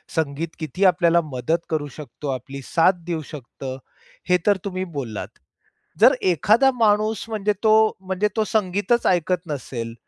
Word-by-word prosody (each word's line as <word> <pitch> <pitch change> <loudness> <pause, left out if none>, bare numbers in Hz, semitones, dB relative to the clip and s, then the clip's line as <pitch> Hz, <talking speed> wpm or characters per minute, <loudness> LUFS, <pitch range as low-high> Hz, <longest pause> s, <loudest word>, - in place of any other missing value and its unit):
संगीत 160 0 -1
किती 160 +5 -1
आपल्याला 170 -2 +4
मदत 160 +7 -1
करू 155 -2 -1
शकतो, 150 -1 -7
आपली 135 +2 -6
साथ 170 +5 +2
देऊ 170 -2 -2
शकतं 130 -1 -7 0.5
हे 180 - +5
तर 205 -1 +5
तुम्ही 185 -1 -3
बोललात. 115 -6 -4 0.7
जर - - +8
एखादा 215 - +4
माणूस 215 -1 +2
म्हणजे 210 -1 0
तो 220 - +5 0.3
म्हणजे 190 +2 0
तो 220 - +3
संगीतच 205 +2 0
ऐकत 180 0 +1
नसेल 120 -6 -5
175 Hz, 145 wpm, -22 LUFS, 145-200 Hz, 0.7 s, जर